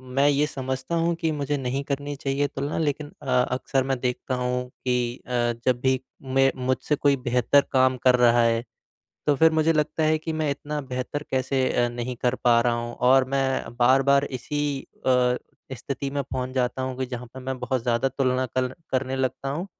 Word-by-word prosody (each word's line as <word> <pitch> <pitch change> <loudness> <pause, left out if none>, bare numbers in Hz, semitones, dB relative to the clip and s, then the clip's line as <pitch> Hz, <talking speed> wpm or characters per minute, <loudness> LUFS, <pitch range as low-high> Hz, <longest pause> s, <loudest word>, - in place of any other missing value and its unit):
मैं 140 +1 +4
ये 145 +1 +3
समझता 130 +3 -3
हूँ 170 +1 +2
कि 165 -1 -1
मुझे 145 -1 -1
नहीं 135 +1 -2
करनी 145 +1 -3
चाहिए 140 +1 -1
तुलना 140 +2 -4
लेकिन 150 -1 -1
अ, - - -10 0.2
अक्सर 130 +1 0
मैं 135 -1 -1
देखता 125 +1 -2
हूँ 125 0 -1
कि 125 -1 -2
अ, - - -8 0.3
जब 125 -1 +2
भी 130 0 +2 0.3
मैं 135 0 +4
मुझसे 130 +3 +1
कोई 140 0 +3
बेहतर 125 +2 +3
काम 130 0 +4
कर 125 -1 +6
रहा 120 -1 +5
है, 115 0 +2 0.6
तो 145 - +4
फिर 160 +2 +6
मुझे 160 +1 +3
लगता 155 +1 0
है 155 0 +3
कि 160 +1 -4
मैं 155 -2 0
इतना 150 +1 -4
बेहतर 130 +2 -4
कैसे 130 0 +1
अ, 120 0 +2
नहीं 120 +1 -4
कर 125 0 +2
पा 120 -1 +5
रहा 120 0 +2
हूँ 120 0 -4 0.2
और 135 0 +6
मैं 135 -3 -1
बार-बार 135 +3 +4
इसी 145 +2 -3 0.3
अ, 125 -1 +3 0.4
स्थिति 140 +2 -4
में 140 0 -1
पहुँच 130 -1 -4
जाता 130 0 0
हूँ 130 -1 -3
कि 130 - -1
जहाँ 125 -1 -6
पे 130 - -7
मैं 130 0 -4
बहुत 125 0 -1
ज़्यादा 120 +2 +1
तुलना 130 -1 0
कर 130 +1 -2 0.2
करने 130 0 -1
लगता 130 +1 -2
हूँ, 170 +7 -3
130 Hz, 195 wpm, -25 LUFS, 125-140 Hz, 0.6 s, कर